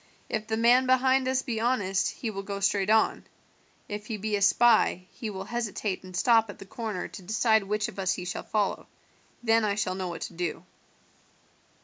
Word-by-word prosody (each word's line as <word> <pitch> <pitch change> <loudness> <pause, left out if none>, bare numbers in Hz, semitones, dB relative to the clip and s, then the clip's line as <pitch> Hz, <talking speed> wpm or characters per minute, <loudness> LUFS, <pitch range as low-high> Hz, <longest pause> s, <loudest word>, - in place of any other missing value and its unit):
If 215 0 -3
the 220 0 -1
man 245 +3 +4
behind 260 0 +3
us 260 0 +1
be 235 -5 -3
honest 205 -6 +1
he 230 -4 -5
will 195 -1 -5
go 200 0 -5
straight 200 0 +1
on; 220 0 +3 0.6
if 210 0 -6
he 220 - -3
be 210 +1 -2
a 200 - -2
spy, 205 -2 +4
he 225 - -6
will 190 -2 -5
hesitate 210 -3 -3
and 185 -1 -7
stop 225 0 +4
at 205 - -8
the 195 - -11
corner 215 -2 -4
to - - -10
decide 220 +3 +2
which 210 +1 -1
of - - -9
us 185 -1 +1
he 180 - -6
shall 180 - -4
follow; 210 -2 -1 0.6
then 225 -1 +3
I 205 -1 +1
shall 195 -3 -1
know 185 -1 -4
what 170 -1 -6
to - - -5
do." 170 -1 -4
210 Hz, 205 wpm, -27 LUFS, 195-230 Hz, 0.6 s, man